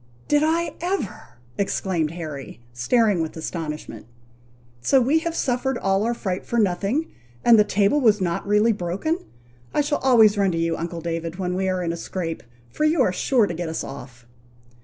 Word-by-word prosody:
"Did 295 Hz, 0 st, +3 dB
I 330 Hz, +2 st, +1 dB
ever 350 Hz, -, -4 dB
!" 120 Hz, 0 st, -30 dB
exclaimed 185 Hz, -5 st, 0 dB
Harry, 155 Hz, -8 st, -7 dB
staring 200 Hz, -, +2 dB
with 160 Hz, 0 st, -4 dB
astonishment, 155 Hz, -8 st, -6 dB, 0.7 s
"so 265 Hz, -, +4 dB
we 275 Hz, +6 st, +3 dB
have 330 Hz, +1 st, -3 dB
suffered 255 Hz, -1 st, 0 dB
all 195 Hz, -2 st, +1 dB
our 235 Hz, +2 st, 0 dB
fright 190 Hz, -5 st, -3 dB
for 235 Hz, -, -3 dB
nothing, 210 Hz, -, 0 dB, 0.3 s
and 230 Hz, -2 st, +7 dB
the -, -, +7 dB
table 205 Hz, +7 st, +2 dB
was 215 Hz, -4 st, +4 dB
not 175 Hz, 0 st, -2 dB
really 210 Hz, +3 st, +4 dB
broken! 200 Hz, -, -2 dB, 0.6 s
I -, -, +4 dB
shall 290 Hz, 0 st, 0 dB
always 225 Hz, -6 st, +5 dB
run 195 Hz, -3 st, +2 dB
to -, -, -1 dB
you, 165 Hz, 0 st, 0 dB
uncle 170 Hz, 0 st, -5 dB
David, 165 Hz, 0 st, -3 dB
when 180 Hz, -1 st, -2 dB
we 190 Hz, +1 st, 0 dB
are 185 Hz, -1 st, -1 dB
in 170 Hz, -1 st, -1 dB
a -, -, -5 dB
scrape, 165 Hz, -1 st, -4 dB, 0.3 s
for -, -, -2 dB
you 310 Hz, +1 st, +3 dB
are 185 Hz, -, +1 dB
sure 240 Hz, +4 st, +2 dB
to 175 Hz, -, -4 dB
get 170 Hz, 0 st, -4 dB
us 160 Hz, -, -3 dB
off." 125 Hz, -3 st, -10 dB
195 Hz, 190 wpm, -23 LUFS, 165-240 Hz, 0.7 s, and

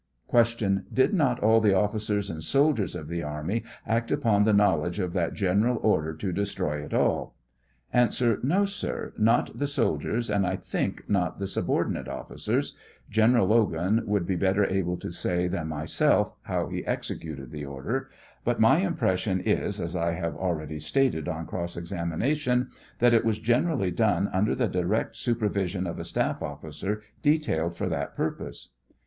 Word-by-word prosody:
Q. 115 Hz, -5 st, +3 dB
Did 130 Hz, +10 st, +3 dB
not 135 Hz, -10 st, +2 dB
all 110 Hz, +1 st, +5 dB
the 105 Hz, -2 st, +4 dB
ofScers 105 Hz, 0 st, 0 dB
and 80 Hz, -1 st, -6 dB
soldiers 135 Hz, -, +2 dB
of 80 Hz, -4 st, -6 dB
the 85 Hz, +1 st, -3 dB
army 75 Hz, +9 st, -3 dB, 0.2 s
act 115 Hz, +1 st, 0 dB
upon 115 Hz, -8 st, +3 dB
the 110 Hz, -, +4 dB
knowledge 90 Hz, -5 st, +3 dB
of 90 Hz, -4 st, -2 dB
that 85 Hz, -3 st, -1 dB
general 105 Hz, +5 st, +2 dB
order 80 Hz, -7 st, +2 dB
to 95 Hz, +4 st, -3 dB
destroy 90 Hz, -6 st, -2 dB
it -, -, -9 dB
all? -, -, +1 dB, 0.6 s
A. 125 Hz, -1 st, +5 dB, 0.3 s
No, 180 Hz, +10 st, +2 dB
sir; 200 Hz, +2 st, -4 dB
not 115 Hz, +2 st, +2 dB
the 145 Hz, -, +1 dB
soldiers, 120 Hz, -3 st, 0 dB
and 100 Hz, -1 st, +2 dB
I 95 Hz, 0 st, 0 dB
think -, -, -3 dB
not 90 Hz, -4 st, 0 dB
the 100 Hz, -, -3 dB
sub 95 Hz, -, -2 dB
ordinate -, -, 0 dB
officers; -, -, -2 dB, 0.4 s
General 110 Hz, +1 st, +4 dB
Logan 105 Hz, -1 st, +2 dB
would 100 Hz, -4 st, +1 dB
be 95 Hz, -, 0 dB
better 100 Hz, +3 st, +2 dB
able 90 Hz, -2 st, 0 dB
to 85 Hz, -, -6 dB
say 90 Hz, +1 st, 0 dB
than 85 Hz, -2 st, -2 dB
myself 80 Hz, 0 st, +1 dB
how -, -, -2 dB
he -, -, -4 dB
executed 70 Hz, -6 st, -4 dB
the 75 Hz, -1 st, -6 dB
order; 70 Hz, -1 st, -4 dB, 0.3 s
but 120 Hz, 0 st, 0 dB
my 135 Hz, +8 st, +6 dB
impression 100 Hz, -, 0 dB
is, 105 Hz, 0 st, 0 dB
as 85 Hz, 0 st, -3 dB
I 85 Hz, -1 st, 0 dB
have 85 Hz, -1 st, -3 dB
already 80 Hz, -4 st, -3 dB
stated 80 Hz, -, +1 dB
on 80 Hz, -1 st, -4 dB
cross 85 Hz, +1 st, -4 dB
exami 85 Hz, -1 st, -4 dB
nation, 125 Hz, -, +1 dB, 0.3 s
that 120 Hz, 0 st, +4 dB
it 115 Hz, -, +4 dB
was 110 Hz, -2 st, +1 dB
generally 120 Hz, -, +1 dB
done 100 Hz, 0 st, +2 dB
under 95 Hz, +3 st, +1 dB
the 125 Hz, -2 st, +1 dB
direct 95 Hz, +5 st, -1 dB
supervision 100 Hz, -6 st, -1 dB
of 85 Hz, -, -4 dB
a -, -, -4 dB
staff -, -, -1 dB
officer 80 Hz, +8 st, -4 dB, 0.2 s
detailed 145 Hz, -, +1 dB
for -, -, -2 dB
that -, -, -3 dB
purpose. -, -, -4 dB
100 Hz, 170 wpm, -27 LUFS, 85-115 Hz, 0.6 s, my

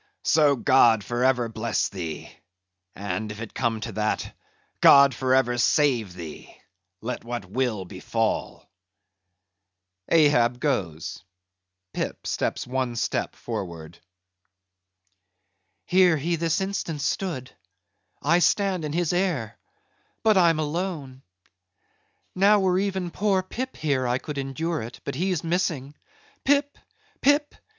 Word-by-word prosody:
So: 150 Hz, -3 st, +4 dB
God 120 Hz, -5 st, +4 dB
for 120 Hz, +3 st, -2 dB
ever 125 Hz, -2 st, +2 dB
bless 115 Hz, 0 st, -1 dB
thee; 85 Hz, -5 st, -6 dB, 0.6 s
and 105 Hz, +1 st, -4 dB
if 105 Hz, -, -8 dB
it 115 Hz, -2 st, -7 dB
come 115 Hz, -1 st, -1 dB
to 115 Hz, +1 st, -4 dB
that,—God 130 Hz, +5 st, +2 dB
for 130 Hz, +2 st, +1 dB
ever 120 Hz, -2 st, +2 dB
save 120 Hz, -, +2 dB
thee, 85 Hz, -4 st, -10 dB, 0.4 s
let 125 Hz, +3 st, -4 dB
what 120 Hz, -3 st, -5 dB
will 110 Hz, -1 st, -2 dB
befall." 105 Hz, +4 st, -3 dB, 1.4 s
(Ahab 125 Hz, -7 st, +4 dB
goes; 95 Hz, -, -2 dB, 0.7 s
Pip -, -, -4 dB
steps -, -, -2 dB
one 125 Hz, -1 st, -2 dB
step -, -, -2 dB
forward.) 85 Hz, -3 st, -6 dB, 1.9 s
"Here 180 Hz, -3 st, +4 dB
he 170 Hz, +4 st, -1 dB
this 165 Hz, +3 st, 0 dB
instant 190 Hz, -6 st, -3 dB
stood; 145 Hz, -5 st, -2 dB, 0.7 s
I 170 Hz, +4 st, +4 dB
stand 190 Hz, -1 st, +2 dB
in 150 Hz, -1 st, -3 dB
his 175 Hz, 0 st, 0 dB
air,—but 175 Hz, -, -2 dB
I'm 170 Hz, -4 st, +4 dB
alone. 155 Hz, -4 st, -3 dB, 1.1 s
Now 200 Hz, +3 st, +5 dB
were 185 Hz, -1 st, +2 dB
even 190 Hz, -3 st, -2 dB
poor 195 Hz, -1 st, +1 dB
Pip 255 Hz, +7 st, -5 dB
here 140 Hz, -5 st, 0 dB
I 125 Hz, +1 st, +1 dB
could 145 Hz, +2 st, -6 dB
endure 155 Hz, +4 st, -2 dB
it, 115 Hz, +2 st, -8 dB
but -, -, -4 dB
he's 180 Hz, +3 st, -1 dB
missing. 165 Hz, -5 st, -1 dB, 0.5 s
Pip! 285 Hz, +1 st, +2 dB, 0.5 s
Pip! 290 Hz, +1 st, +3 dB
140 Hz, 115 wpm, -25 LUFS, 115-175 Hz, 1.9 s, Now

